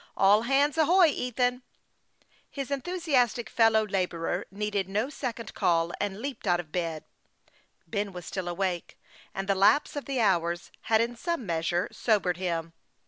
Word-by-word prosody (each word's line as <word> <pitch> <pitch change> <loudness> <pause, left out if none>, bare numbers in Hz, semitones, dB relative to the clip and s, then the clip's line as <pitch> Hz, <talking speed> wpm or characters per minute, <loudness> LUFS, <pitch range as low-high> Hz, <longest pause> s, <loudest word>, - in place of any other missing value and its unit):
" - - -40
All 205 +2 +6
hands 280 +5 +2
ahoy, 340 +2 +6
Ethan! 250 -1 -1 0.4
" - - -45 0.3
His 275 -1 -6
enthusiastic 280 -6 0
fellow 220 -1 +4
laborer 180 -2 -2
needed 200 -1 -2
no 215 +8 -1
second 235 -7 -5
call, 170 -1 +1
and 205 -1 -2
leaped 270 -3 -5
out 175 -1 +3
of 160 -3 -7
bed. 165 -3 -2 0.8
Ben 205 -2 -2
was 180 -2 -8
still 185 -2 -4
awake, 175 0 -3 0.4
and 195 0 -3
the 200 - +3
lapse 200 +12 +3
of 290 - -4
the 270 -2 -2
hours 175 -5 +1 0.2
had 220 0 +5
in 235 +1 -1
some 335 +1 -3
measure 170 +1 0
sobered 190 -6 +1
him. 165 -3 -3
210 Hz, 160 wpm, -28 LUFS, 180-250 Hz, 0.8 s, All